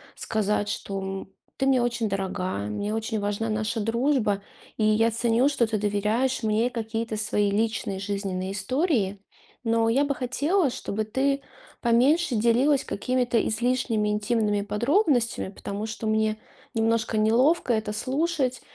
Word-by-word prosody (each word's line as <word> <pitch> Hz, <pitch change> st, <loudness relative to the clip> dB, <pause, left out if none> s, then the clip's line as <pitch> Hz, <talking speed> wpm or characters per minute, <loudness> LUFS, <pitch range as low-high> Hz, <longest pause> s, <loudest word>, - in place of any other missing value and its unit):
сказать, 210 Hz, -1 st, -1 dB
что: 195 Hz, -1 st, -4 dB, 0.3 s
"Ты 270 Hz, -, +1 dB
мне 260 Hz, -2 st, +4 dB
очень 235 Hz, -2 st, -1 dB
дорога, 190 Hz, -, -2 dB
мне 205 Hz, -, -3 dB
очень 225 Hz, 0 st, -2 dB
важна 205 Hz, +2 st, -2 dB
наша 215 Hz, +1 st, -1 dB
дружба, 225 Hz, -2 st, +1 dB, 0.4 s
и 220 Hz, -, 0 dB
я 215 Hz, +2 st, +3 dB
ценю, 235 Hz, +3 st, +2 dB
что 260 Hz, -5 st, +1 dB
ты 215 Hz, 0 st, -1 dB
доверяешь 210 Hz, +6 st, 0 dB
мне 220 Hz, +2 st, +1 dB
какие-то 225 Hz, -1 st, -3 dB
свои 210 Hz, -1 st, +1 dB
личные 215 Hz, -2 st, -1 dB
жизненные 195 Hz, -2 st, -3 dB
истории. 210 Hz, -, 0 dB, 0.4 s
Но 225 Hz, -1 st, +2 dB
я 265 Hz, +5 st, +3 dB
бы 285 Hz, -, 0 dB
хотела, 285 Hz, +7 st, +1 dB
чтобы 215 Hz, -3 st, -3 dB
ты 275 Hz, +5 st, 0 dB, 0.4 s
поменьше 260 Hz, +6 st, +3 dB
делилась 245 Hz, +6 st, +3 dB
какими-то 250 Hz, -2 st, 0 dB
излишними 225 Hz, -2 st, 0 dB
интимными 210 Hz, 0 st, +1 dB
подробностями, 235 Hz, -, +1 dB
потому 200 Hz, +2 st, -5 dB
что 225 Hz, 0 st, -6 dB
мне 215 Hz, 0 st, +1 dB, 0.4 s
немножко 225 Hz, 0 st, +1 dB
неловко 245 Hz, +6 st, +3 dB
это 220 Hz, -1 st, -1 dB
слушать". 265 Hz, +1 st, -1 dB
225 Hz, 135 wpm, -26 LUFS, 210-250 Hz, 0.4 s, мне